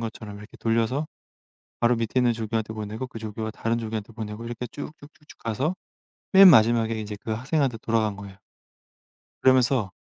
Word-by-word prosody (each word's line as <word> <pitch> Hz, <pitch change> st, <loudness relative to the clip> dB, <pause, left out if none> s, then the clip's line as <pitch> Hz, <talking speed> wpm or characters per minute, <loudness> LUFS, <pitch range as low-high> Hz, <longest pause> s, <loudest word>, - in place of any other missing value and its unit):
것처럼 110 Hz, -2 st, -6 dB
이렇게 105 Hz, +2 st, -13 dB
돌려서 115 Hz, +6 st, 0 dB, 0.7 s
바로 120 Hz, +1 st, +3 dB
밑에 115 Hz, +2 st, 0 dB
있는 120 Hz, -1 st, +3 dB
조교한테 110 Hz, -1 st, -3 dB
보내고 110 Hz, +3 st, -5 dB
그 115 Hz, -, -9 dB
조교가 110 Hz, 0 st, -5 dB
다른 115 Hz, +1 st, -1 dB
조교한테 110 Hz, -1 st, -5 dB
보내고 110 Hz, 0 st, -6 dB
이렇게 120 Hz, +1 st, -5 dB
쭉쭉쭉쭉 150 Hz, +3 st, -11 dB
가서 130 Hz, -, -1 dB, 0.6 s
맨 195 Hz, 0 st, +10 dB
마지막에 115 Hz, -4 st, +4 dB
인제 105 Hz, -1 st, -5 dB
그 110 Hz, -, -4 dB
학생한테 130 Hz, +1 st, 0 dB
돌아간 110 Hz, -2 st, 0 dB
거예요. 100 Hz, -1 st, -10 dB, 1.1 s
그러면서 130 Hz, -5 st, +3 dB
115 Hz, 395 characters per minute, -25 LUFS, 110-125 Hz, 1.1 s, 맨